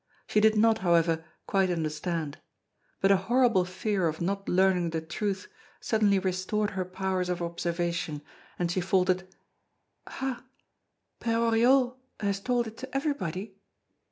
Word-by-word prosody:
She 215 - +2
did 220 +1 +5
not, 225 +1 +4
however, 165 -3 +2 0.2
quite 195 -2 +2
understand; 160 -1 -2 0.6
but 195 - +4
a 195 - +6
horrible 230 -1 +3
fear 185 0 -1
of 160 0 -3
not 195 +3 -2
learning 185 -2 +3
the 165 0 -2
truth 190 +4 -3 0.3
suddenly 210 -3 +2
restored 190 +3 -1
her 185 -1 -2
powers 185 0 -2
of 180 -1 -1
observation, 170 -2 -2 0.3
and 175 -1 0
she 185 - 0
faltered: 185 0 +1 0.8
"Ha! 265 -2 -4 0.8
Père 230 0 +1
Oriol 250 +2 +4 0.2
has 200 -2 -1
told 245 +3 0
it 220 0 -9
to 265 +1 -4
everybody?" 200 - -3
190 Hz, 135 wpm, -28 LUFS, 175-220 Hz, 0.8 s, a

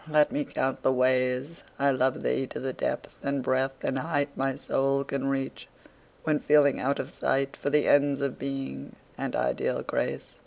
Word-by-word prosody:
Let 150 +4 +4
me 290 +2 -1
count 135 - -2
the - - +3
ways. 130 +4 +1
I 140 0 +3
love 130 0 +1
thee 135 - 0
to - - -6
the 130 0 -3
depth - - -3
and 140 -1 -1
breadth 130 +1 0
and 130 - 0
height 145 -1 -1
My 135 0 0
soul 135 0 +1
can 135 0 -3
reach, 135 -1 -2 0.6
when 155 -2 +2
feeling 145 -2 +4
out 140 +2 0
of - - -4
sight 135 0 0
For - - -2
the 150 +1 +3
ends 145 -1 +4
of 140 -2 -2
Being 135 - -5 0.2
and - - -3
ideal 60 - 0
Grace. - - -2
135 Hz, 185 wpm, -28 LUFS, 130-140 Hz, 0.6 s, Let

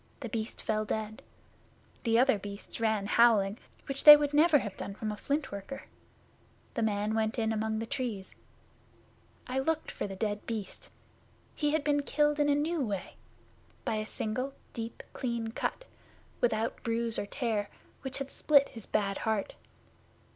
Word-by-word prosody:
The 240 - -4
Beast 220 0 -4
fell 215 0 0
dead. 215 0 -3 0.8
The 230 0 +4
other 255 -3 +4
Beasts 200 +2 -8
ran 220 -2 +1
away 200 - -4
howling, 220 -4 +5 0.3
which 275 0 -4
they 295 -1 +13
would 290 0 -1
never 310 +1 +6
have 210 -7 -4
done 200 - -6
from 215 0 -3
a - - -4
Flint 285 +6 -2
worker. 200 +7 -6 0.9
The 235 - -2
man 210 -1 0
went 220 +1 0
in 225 -1 +1
among 220 0 -1
the 225 - -2
Trees. 235 -7 -4 1.1
I 255 +1 -1
looked 320 +3 -1
for - - -4
the 195 - -6
dead 205 +1 -2
Beast. 215 -4 -5 0.6
He 295 - 0
had 315 -2 +1
been 290 -1 +2
killed 295 +1 +1
in 290 0 +3
a 285 - +4
new 310 +2 0
way 200 -5 -3 0.7
by 220 - 0
a 215 0 -3
single 255 +7 -3 0.2
deep, 230 0 -6
clean 235 -3 -2
cut, - - -3 0.5
without 225 -1 0
bruise 230 0 0
or 205 - -3
tear, 220 -5 -1 0.3
which 265 -1 -3
had 275 -1 -5
split 285 -2 +4
his 225 -3 -7
bad 200 -2 0
heart. 220 -3 -1
225 Hz, 170 wpm, -31 LUFS, 215-275 Hz, 1.1 s, they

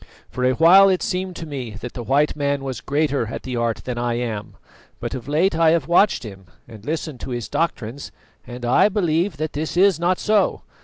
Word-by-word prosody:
For 125 - -4
a 130 0 +3
while 185 +7 +7
it 185 -1 +1
seemed 185 0 -3
to 165 - -6
me 130 -8 -6
that 125 +1 -7
the 120 - -6
white 140 +5 +1
man 140 -1 -1
was 130 -4 -5
greater 145 -4 0
at - - -6
the 130 -1 -4
art 115 -1 -1
than 125 -2 -3
I 120 -1 -1
am; 115 -4 -4 0.4
but - - -5
of 130 -2 -6
late 160 +5 +1
I 165 0 +4
have 160 -3 +1
watched 175 +1 +3
him 95 -4 -10 0.2
and 110 -3 -13
listened 155 -1 -4
to - - -7
his 120 -2 -4
doctrines, 140 -5 -3 0.3
and 120 0 -8
I 125 +11 +4
believe 175 -4 0
that 155 +1 -3
this 155 +3 -4
is 190 -3 +4
not 175 +2 +1
so. 210 -3 +1
145 Hz, 215 wpm, -21 LUFS, 120-170 Hz, 0.4 s, while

